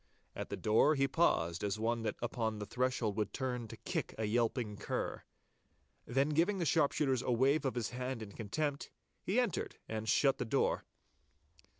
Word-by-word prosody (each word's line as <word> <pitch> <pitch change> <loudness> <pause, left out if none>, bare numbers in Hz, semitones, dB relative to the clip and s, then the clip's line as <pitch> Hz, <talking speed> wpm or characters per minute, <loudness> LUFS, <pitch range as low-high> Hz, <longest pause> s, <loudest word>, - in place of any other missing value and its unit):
At - - -5
the - - -3
door 115 +8 +4
he 135 -1 +2
paused 85 - +2
as 100 0 0
one 115 +1 0
that 110 -2 -2
upon 110 -2 -1
the 105 - -4
threshold 125 -2 0
would 105 -2 -1
turn 125 -3 -2
to - - -9
kick - - -3
a 110 - -1
yelping 115 -1 0
cur. - - -3 0.9
Then 135 +4 +2
giving 170 +7 +2
the 175 - 0
sharpshooters 140 -4 +2
a 125 - -1
wave 135 +5 +3
of 130 - 0
his 120 -1 -2
hand 125 -1 -3
in 100 - -9
contempt, 140 +8 -2 0.3
he - - +1
entered - - -1
and 110 0 -3
shut 135 -1 +4
the - - +1
door. 110 - +1
120 Hz, 180 wpm, -34 LUFS, 110-135 Hz, 0.9 s, door